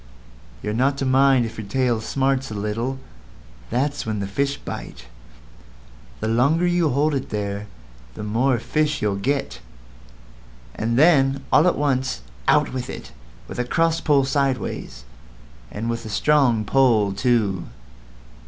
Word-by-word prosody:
You're 105 - -2
not 135 +5 +1
to 135 - -2
mind 130 -1 +4
if 115 0 -7
your 105 - -6
tail 120 0 0
smarts 135 +3 0
a 110 - -6
little; 110 +6 -2 0.7
that's 140 +5 -1
when 110 -1 -3
the 100 - -2
fish 140 +8 -1
bite. - - -8 1.2
The - - -1
longer 140 +10 +2
you 175 -2 +2
hold 145 +3 +1
it 135 -1 -3
there 100 0 -3 0.5
the 105 - -6
more 120 +5 +1
fish 155 +4 -1
you'll 105 -2 +1
get; 100 - -2 1.1
and 115 +2 -1
then 135 -3 +4
all 165 - +5
at 180 - +2
once 130 - 0 0.3
out - - +3
with 130 -1 -4
it, - - -8 0.4
with - - -7
a - - +2
cross 165 +6 +1
pull 140 -3 +3
sideways, 135 - -2 0.6
and 110 - -5
with 115 0 -2
a 110 - -7
strong 120 0 +2
pull 115 -7 +3
too." 105 -5 +1
130 Hz, 145 wpm, -22 LUFS, 110-140 Hz, 1.2 s, all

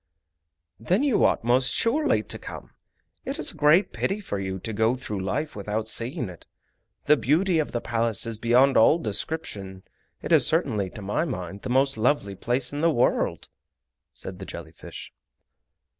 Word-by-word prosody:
"Then 180 - +1
you 275 -7 +2
ought - - +2
most 125 +2 +2
surely 300 +7 +1
to - - -4
come. - - -9 0.5
It 275 +3 -3
is 310 -3 +1
a - - -16
great 155 +6 +3
pity 195 +2 -1
for 105 - -4
you 95 -1 -4
to 110 +4 -6
go 110 +3 +2
through 110 -5 -5
life 145 +11 -3
without 105 +2 -3
seeing 120 +1 0
it. 90 -2 -12 0.6
The 150 - +6
beauty 165 +5 +1
of 155 - -2
the 120 - -2
Palace 115 -2 +2
is 115 -2 -4
beyond 125 +4 +4
all 130 +8 +6
description—it 100 - -5
is - - +6
certainly 100 -3 +1
to 105 - -9
my 105 +10 -1
mind 100 - -6
the - - -6
most 135 0 +2
lovely 110 -4 +1
place 125 +6 -1
in 145 - -3
the 165 - +4
world," 125 -6 0 0.6
said - - -8
the - - -7
jelly - - -8
fish. - - -10
120 Hz, 175 wpm, -25 LUFS, 105-155 Hz, 0.6 s, The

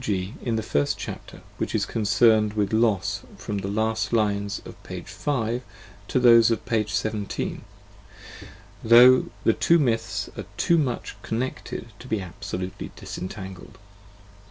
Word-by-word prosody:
g., 95 -2 -2
in 115 -2 -1
the 110 - -1
first 70 -8 0
chapter, - - -8 0.2
which - - -2
is - - +1
concerned 110 0 +3
with 105 -1 -1
Los 100 -3 +1 0.2
from 105 -2 -4
the 95 - -4
last 110 +1 -1
lines 100 -3 0
of - - -8
p. - - -7
5 120 -4 -2 0.5
to - - +1
those 115 -2 +7
of 115 - -1
p. 110 -2 +1
17, 105 0 -3 1.2
though 125 +3 +7 0.2
the 115 - +4
two 170 - +4
myths 110 - 0
are - - -6
too 170 -1 +3
much 130 -5 -2
con 110 - -3
necled 130 -2 -4
to 125 - -11
be 110 -4 0
absolutely 90 +1 -6
disentangled. 95 +1 -8
110 Hz, 145 wpm, -25 LUFS, 100-115 Hz, 1.2 s, those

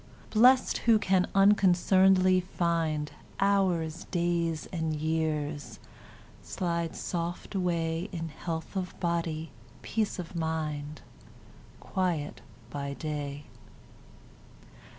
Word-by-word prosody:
Blest, 250 +4 +5
who 225 - +8
can 190 -3 +2
unconcern'dly 190 -1 +5
find 165 -4 -1 0.3
Hours, 185 -4 +1
days, 170 -3 0
and 160 -3 -1
years, 155 -1 -2 0.6
slide 170 -2 -2
soft 175 +2 -4
away 170 -1 -1
In 165 -3 -4
health 160 +4 -5
of 185 -1 -4
body, 165 -3 -1 0.3
peace 215 -2 -1
of 180 -1 -7
mind, 155 -2 -3 0.8
Quiet 175 -6 -2 0.3
by 140 -1 -4
day. 145 -2 -4
170 Hz, 90 wpm, -29 LUFS, 155-185 Hz, 0.8 s, who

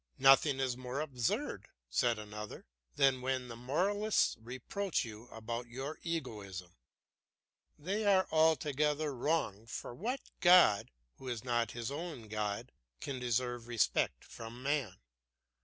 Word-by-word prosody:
"Nothing 135 +1 +6
is 130 -2 0
more 125 +2 -4
absurd," 130 -7 -1 0.2
said 115 - +2
another, 105 0 -7 0.3
"than 135 -2 +4
when 130 -1 -1
the 115 - -6
moralists 195 - +1
reproach 130 - -2
you 110 +1 -9
about 115 +1 -5
your 135 +6 -5
egoism. 100 - -5 1.0
They 195 +8 -2
are 190 -2 +5
altogether 150 -1 +2
wrong; 120 -6 -1
for 115 - -6
what 245 - -2 0.2
god, 175 - +6 0.3
who 130 - -10
is 120 -3 -3
not 120 -3 0
his 120 +1 -4
own 145 -7 -6
god, 105 -1 -2 0.3
can 135 - -4
deserve 120 -1 -1
respect 120 -3 +1
from 115 +2 -9
man? 135 -9 0
125 Hz, 125 wpm, -34 LUFS, 115-150 Hz, 1.0 s, Nothing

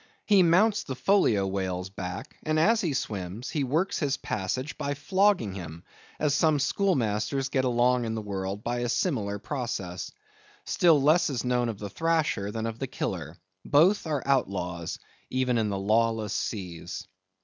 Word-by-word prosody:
He 205 -3 +5
mounts 195 +6 +4
the 135 - -5
Folio 125 - +3
whale's 95 -1 -3
back, 95 +9 -6
and 155 0 0
as 225 +7 +4
he 170 - 0
swims, 105 -3 -4
he 150 - 0
works 155 +9 0
his 145 -3 0
passage 130 +9 -3
by 145 0 -2
flogging 185 - +2
him; 85 -3 -8 0.4
as 150 -2 +2
some 155 0 +3
schoolmasters 135 - 0
get 130 -1 +1
along 125 0 +2
in 110 0 -2
the 110 - -3
world 100 0 -4
by 120 +1 -1
a 120 0 -1
similar 115 - 0
process. 105 -7 -4 0.5
Still 170 -5 +4
less 155 +5 +4
is 130 -5 -2
known 125 -1 +1
of 110 - -4
the 105 - -5
Thrasher 160 - 0
than 110 +1 -3
of 115 0 -4
the 135 - -2
Killer. 85 - -4 0.3
Both 170 +6 +4
are 150 -4 -1
outlaws, 90 -10 -1 0.3
even 130 -2 +1
in 110 -2 0
the 100 - -2
lawless 110 +2 +1
seas. 90 -5 -4
120 Hz, 165 wpm, -27 LUFS, 100-150 Hz, 0.5 s, He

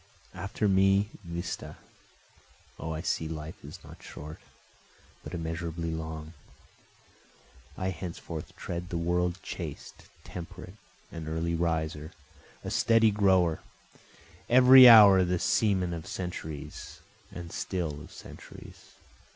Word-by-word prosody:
After 100 +2 -2
me, 95 +1 +3
vista! 85 +1 -6 1.0
O 80 - -5
I 80 0 -4
see 80 -2 -2
life 80 0 -8
is 75 +6 -9
not - - -14
short, 75 +1 -10 0.8
but - - -7
immeasurably 85 0 -4
long, 80 0 -6 1.4
I 95 - -2
henceforth 85 -2 -7
tread 90 +1 -6
the 85 - -3
world 90 +1 0
chaste, - - -8 0.2
temperate, 90 +1 -9 0.4
an 80 -2 -7
early 80 +2 -2
riser, 80 -1 -2 0.5
a - - -5
steady 115 -1 +4
grower, 95 -5 +2 0.9
Every 130 +1 +9
hour 100 -5 +9
the 90 0 0
semen 95 -2 +1
of 80 -1 -7
centuries, 80 -5 -7 0.3
and 85 -1 -8
still 80 -6 -4
of 80 - -13
centuries. - - -13
85 Hz, 110 wpm, -28 LUFS, 80-95 Hz, 1.4 s, Every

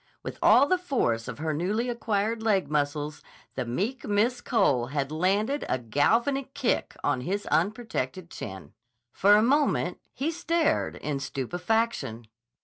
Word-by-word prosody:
With - - -6
all 245 +6 +6
the 370 +2 +2
force 180 - 0
of - - -6
her 155 +1 -2
newly 200 +10 -1
acquired 225 -2 -1
leg 205 -7 +1
muscles, 150 0 -1 0.3
the 130 - -3
meek 205 - -2
Miss 225 +4 +1
Cole 140 - +2
had 140 +1 -2
landed 200 - +1
a - - +2
galvanic 235 - +1
kick 265 -4 -1
on 145 -3 +1
his 195 +8 -2
unprotected 185 - -1
chin. 95 -3 -8 0.4
For 205 +2 +5
a 210 - +4
moment 285 +5 +2
he 295 +5 -2
stared 330 -1 0
in 145 -1 -3
stupefaction. 160 - -2
200 Hz, 140 wpm, -27 LUFS, 145-240 Hz, 0.4 s, all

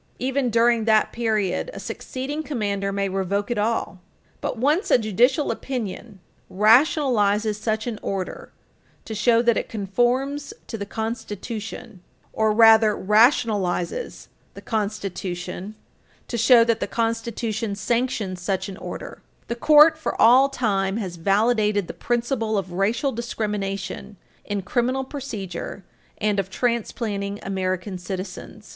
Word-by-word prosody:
Even 260 0 0
during 230 0 +3
that 220 -1 +3
period, 215 - -1
a - - -6
succeeding 275 +4 -5
commander 205 -9 -2
may 200 0 -1
revoke 195 +3 -2
it 235 - 0
all. 210 -3 -1 0.4
But - - -3
once 295 - +1
a - - +6
judicial 245 - +2
opinion 225 -4 -5 0.3
rationalizes 215 - +3
such 220 0 -1
an 235 -3 -4
order 190 -2 -4 0.5
to 220 - -6
show 230 +2 +3
that 235 -1 +3
it - - -3
conforms 245 +8 -1
to - - -6
the 200 - -5
Constitution, 220 -2 -6 0.3
or 220 -1 +2
rather 220 -1 +6
rationalizes 210 - +1 0.3
the - - -9
Constitution 200 -2 -4 0.5
to - - -4
show 235 +1 +6
that 230 -1 +1
the - - -2
Constitution 225 -2 -2
sanctions 210 -3 -1
such 190 +2 -1
an 190 - -8
order, - - -8 0.3
the 235 - -1
Court 305 +5 +6
for 315 - -3
all 255 +4 +6
time 200 -6 0
has 185 -6 -4
validated 210 +2 +2
the - - -6
principle 235 -2 -1
of 185 -2 -3
racial 220 +9 0
discrimination 205 -4 -4 0.3
in 205 -2 -3
criminal 250 +5 0
procedure 210 - -6 0.3
and 210 -1 0
of 195 -1 -2
transplanting 215 -3 -2
American 185 0 -3
citizens. 185 +3 -7
220 Hz, 130 wpm, -23 LUFS, 200-240 Hz, 0.5 s, a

